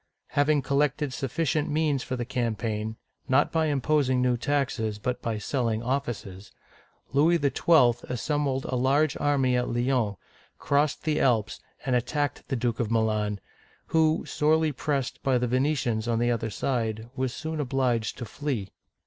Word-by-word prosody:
Having 145 0 +2
collected 140 0 0
sufficient 150 +4 -1
means 150 -3 +1
for 130 - -4
the 120 -1 -3
campaign, 115 -3 -2 0.2
— - - -52
not 135 +3 +3
by 160 -1 +1
imposing 140 -2 +2
new 125 -1 +2
taxes, 120 -5 -1
but 125 +4 -3
by 115 -2 -2
selling 115 0 -1
offices, 120 -7 -3 0.3
— - - -34
Louis 160 +5 +4
XII. 140 -4 +3
assembled 140 +2 -1
a 130 - -2
large 135 +4 +2
army 135 -3 +2
at 125 0 0
Lyons, 120 -3 0 0.4
crossed 145 0 +1
the 155 -1 +1
Alps, 115 -5 +1 0.3
and 130 -2 +1
attacked 145 +3 -1
the 135 - -1
Duke 120 -2 -1
of 115 -4 0
Milan, 110 -2 0 0.5
who, 160 -1 +2
sorely 155 +1 +2
pressed 140 -1 -2
by 135 -2 +2
the 125 - 0
Venetians 125 -3 0
on 115 -1 +1
the 120 +1 +2
other 115 -1 -1
side, 110 0 -2
was 130 -1 -1
soon 160 +4 -5
obliged 125 -5 0
to 120 - -5
flee. 115 -5 -4
130 Hz, 155 wpm, -27 LUFS, 115-145 Hz, 0.5 s, Louis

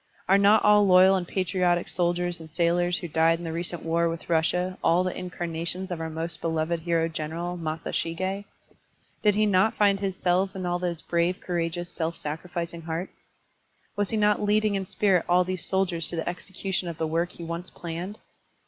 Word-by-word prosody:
Are 195 +1 +5
not 205 +2 +5
all 210 -1 +6
loyal 185 +1 +7
and 180 -2 -2
patriotic 180 -2 +1
soldiers 175 0 0
and 160 -1 -11
sailors 175 +2 +1
who 175 - -5
died 165 +1 +3
in 170 - -8
the 165 - -3
recent 170 +1 -4
war 165 +1 +1
with 165 +1 -6
Russia 180 +3 +1
all 175 +2 +4
the 185 - -2
incarnations 175 +1 -4
of 170 -2 -3
our 160 - -3
most 160 +1 -5
beloved 165 0 0
hero 165 0 +1
general, 165 +2 -4
Masashig6? 165 +4 -3 0.8
Did 210 -1 +3
he 215 +1 +3
not 200 +1 +3
find 200 -2 +3
his 195 -2 -2
selves 185 +2 +1
in 185 -1 -4
all 175 0 0
those 175 -2 -3
brave, 170 +2 0
courageous, 175 0 -3
self 165 0 -3
sacri 155 +4 -5
ficing 170 -1 -4
hearts? 165 +3 -6 0.7
Was 205 -1 0
he 220 - -1
not 210 -1 +3
leading 210 0 +2
in 195 -1 -2
spirit 190 -4 +2
all 180 +1 +5
these 185 -2 -4
soldiers 180 -4 0
to - - 0
the 165 - -3
execution 185 +1 -3
of 170 -2 -5
the 160 - -1
work 165 +3 -1
he 170 - -9
once 170 +2 -5
planned? 175 +5 -6
175 Hz, 195 wpm, -26 LUFS, 165-190 Hz, 0.8 s, loyal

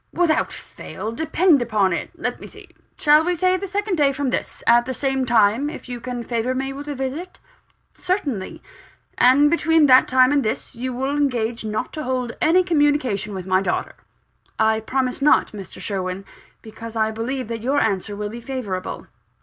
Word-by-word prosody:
"Without 340 -3 +1
fail, 220 - -8
depend 320 +3 +2
upon 210 -6 +1
it. - - -3
Let - - -4
me - - -9
see: - - -15 0.3
shall 300 +1 +5
we 355 +1 0
say 370 +2 +2
the 390 +2 -4
second 405 -1 -2
day 285 -2 +3
from 275 -1 -2
this, - - -4
at 240 +1 +4
the 260 - -3
same 265 0 -1
time, 230 +4 +3
if - - -9
you 245 -1 -6
can 245 -1 -5
favour 235 +2 -2
me 270 +1 -3
with 285 +2 -8
a 290 - -4
visit?" 270 +7 -5 0.6
"Certainly." 295 - -3 0.6
"And 280 +4 +5
between 325 -2 +3
that 260 -2 +6
time 255 0 +4
and 290 -1 +3
this, 215 - -3
you 255 +2 -4
will 265 +3 -2
engage 240 -6 -1
not 215 0 -3
to 305 - -4
hold 250 -2 -2
any 350 +4 +4
communication 290 - +1
with 185 -2 -6
my 185 0 +2
daughter?" 195 - -2 0.6
"I 220 0 +2
promise 255 +3 -2
not, 295 - +4
Mr. 200 -4 -10
Sherwin 190 -1 -4 0.4
because 225 +1 -9
I 220 -1 +1
believe 240 +3 -4
that 230 -1 -4
your 270 +5 +1
answer 205 -1 -1
will 205 0 -4
be 235 +2 -8
favourable." 230 -8 -5
255 Hz, 185 wpm, -22 LUFS, 220-290 Hz, 0.6 s, that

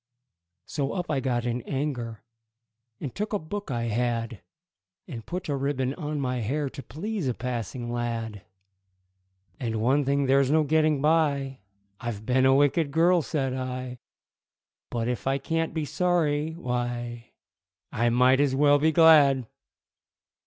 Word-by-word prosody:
So 140 -2 -2
up 180 -4 -3
I 140 - +1
got 120 -2 -1
in 120 0 -1
anger, 125 -5 -4 0.8
And 135 - -5
took 210 +1 -3
a - - +3
book 205 +3 -6
I 120 -3 -2
had, 115 -1 -2 0.7
And 115 -3 -7
put 180 +6 -5
a 145 - 0
ribbon 135 -1 -1
on 150 -2 -4
my 130 -2 -1
hair 135 +5 -2
To 140 - -8
please 190 +3 -4
a 125 - -1
passing 120 0 -4
lad. 115 -3 -3 1.2
And, 115 -4 -2
"One 130 +6 +2
thing 140 +1 +1
there's 135 0 +3
no 155 +1 +4
getting 155 -1 +2
by 145 -4 +1 0.4
I've 110 -3 -5
been 130 +2 +3
a 135 - +5
wicked 145 +2 +3
girl," 170 +4 +3
said 135 -4 -2
I; 130 -1 -5 0.9
"But 115 -1 -2
if 125 +1 -3
I 135 0 +2
can't 165 +3 -1
be 160 -2 -2
sorry, 160 -1 0
why, 120 -5 -4 0.6
I 120 +1 +1
might 125 +2 +4
as 140 -2 +2
well 145 +1 +5
be 160 +2 +3
glad!" 145 -5 +6
135 Hz, 150 wpm, -26 LUFS, 120-150 Hz, 1.2 s, glad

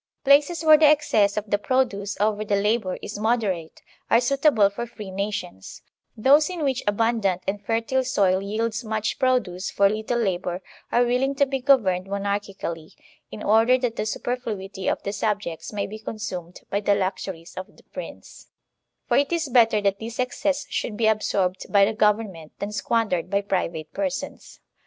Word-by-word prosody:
Places 290 +4 +4
where 310 -1 +8
the 310 - +7
excess 220 -10 +3
of 210 0 -3
the 205 - +2
produce 210 -5 -1
over 210 0 +1
the 205 -1 0
labor 205 -1 0
is - - -6
moderate 210 -8 -1 0.3
are 230 - +5
suitable 270 -4 +3
for 235 +4 -5
free 210 -4 -9
nations; 190 - -5 0.3
those 285 +8 +5
in 350 -4 -4
which 265 -3 0
abundant 205 -3 +1
and 205 +1 -2
fertile 230 +4 0
soil 195 -7 +2
yields 220 +3 -2
much 215 -1 -2
produce 230 -9 0
for 200 - +3
little 215 +3 -1
labor 185 -4 -2 0.3
are 245 +1 +3
willing 255 +3 +1
to 280 - +3
be 270 0 -3
governed 210 -9 +3
monarchically, 200 -5 -4 0.3
in 210 - -8
order 225 +4 +4
that 245 -3 -2
the 215 - -2
superfluity 210 -5 -4
of - - 0
the 200 - -3
sub 210 0 0
jects 170 -5 -7
may 205 -2 -2
be 215 +2 -8
consumed 180 -6 -6
by 200 - +1
the 205 0 +2
luxuries 185 -3 -4
of 185 +2 -8
the - - -20
Prince; - - -10 0.6
for - - +2
it 280 +2 +2
is 330 -4 -1
better 230 -4 +4
that 200 -1 0
this 230 +2 -7
excess 275 +3 -1
should 210 - -3
be 225 - +1
absorbed 200 -4 0
by 200 -1 +6
the 220 - -1
government 210 -7 0
than 205 +1 -4
squandered 210 -5 0
by 200 +1 +2
private 175 -5 -3
persons. 285 -2 -5
210 Hz, 175 wpm, -24 LUFS, 195-245 Hz, 0.6 s, where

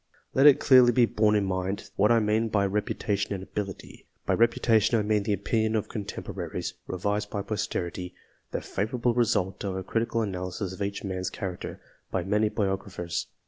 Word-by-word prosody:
Let 135 +2 +6
it 145 - +7
clearly 125 -2 +7
be 120 0 +5
borne 105 -1 +2
in 105 -1 +2
mind, 95 +1 -3
what 105 - +4
I 115 - +5
mean 110 +1 +1
by 100 -2 +2
repu 105 +2 -1
tation 100 -1 -1
and 95 - -6
ability. 95 0 -6 0.2
By - - +2
reputation, 115 -1 +3
I 105 - +1
mean 105 0 +2
the 105 +1 0
opinion 110 +3 0
oi 110 - +3
contemporaries, 105 -3 -5
revised 105 +3 -2
by 100 - -3
posterity 90 -4 -3 0.3
the - - -3
favourable 120 +4 -1
result 105 -6 +1
of 95 -2 -2
a 95 - -3
critical 115 +3 0
analysis 90 -1 -4
of 95 - -10
each 100 0 -3
man's 95 -2 -2
character, 90 -2 -6 0.3
by 95 - -1
many 105 +3 +2
biographers. 95 -4 -2
105 Hz, 180 wpm, -27 LUFS, 95-110 Hz, 0.3 s, it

